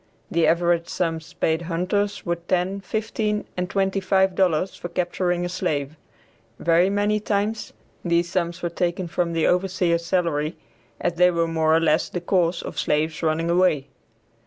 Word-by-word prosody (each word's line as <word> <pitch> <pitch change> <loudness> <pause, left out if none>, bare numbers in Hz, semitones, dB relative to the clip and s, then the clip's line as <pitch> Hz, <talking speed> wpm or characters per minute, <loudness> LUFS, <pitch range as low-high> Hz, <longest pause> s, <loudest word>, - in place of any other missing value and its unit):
The 170 -1 +3
average 170 0 +2
sums 165 -1 -2
paid 160 +1 0
hunters 190 +4 -1
were 170 -1 0
ten, 180 +3 -1
fifteen 215 0 -2
and 180 0 -2
twenty 195 0 0
five 190 0 +2
dollars 180 -1 +1
for 175 - -7
capturing 175 0 -1
a - - -1
slave; 155 -5 -2 0.6
very 170 +2 +3
many 205 +1 +1
times, 210 +1 -1 0.3
these 170 0 +2
sums 175 -1 -2
were 175 - 0
taken 175 +1 -2
from 170 0 -1
the 165 -1 +1
overseer's 180 -2 +1
salary, 170 -3 0 0.4
as - - 0
they 180 +1 +6
were 170 -1 +1
more 160 -1 +2
or - - +5
less 160 -1 +2
the 180 - -3
cause 175 -1 +1
of - - -5
slaves 155 +1 0
running 165 +1 0
away. 170 -6 +2
175 Hz, 160 wpm, -23 LUFS, 165-190 Hz, 0.6 s, they